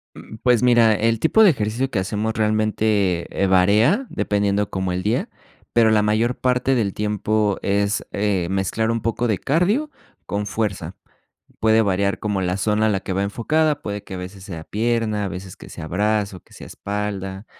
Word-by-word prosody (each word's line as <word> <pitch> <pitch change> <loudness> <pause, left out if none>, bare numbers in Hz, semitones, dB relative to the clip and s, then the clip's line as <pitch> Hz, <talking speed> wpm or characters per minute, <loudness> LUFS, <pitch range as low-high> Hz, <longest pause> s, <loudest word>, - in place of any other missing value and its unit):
Mm, - - -11
pues 125 -3 +4
mira, 120 -3 +5
el 115 +2 +1
tipo 220 - +4
de 200 - +8
ejercicio 115 +2 -2
que 105 - -1
hacemos 105 +4 -2
realmente, 105 -4 +1
eh, 100 - +3
varía, 105 - +3
dependiendo 100 0 0
como 95 -1 -2
el 90 0 -2
día, 110 +4 0 0.4
pero, 115 -2 +5
la 110 -1 +4
mayor 110 +4 +1
parte 125 +1 +1
del 105 -6 0
tiempo 105 -1 0
es, 100 +1 0
eh, 100 -4 0
mezclar 100 +4 0
un 115 -1 -2
poco 115 +2 -1
de 105 -4 +1
cardio 200 - +1 0.4
con 100 0 -3
fuerza. 100 -5 -3 0.6
Puede 110 0 +4
variar 100 0 0
como 105 -2 -2
la 90 0 -1
zona 105 +2 +1
a - - +3
la 100 -2 0
que 95 - -5
va 95 - 0
enfocada, 150 +9 0
puede 105 -1 -5
que - - -9
a - - -4
veces 90 +1 -8
sea 85 -5 -7
pierna, 110 -1 -1
a - - -2
veces 95 0 -8
que - - -12
sea 80 - -8
brazo, 105 0 -1
que - - -21
sea - - -10
espalda, 100 -1 -5
105 Hz, 190 wpm, -21 LUFS, 100-115 Hz, 0.6 s, de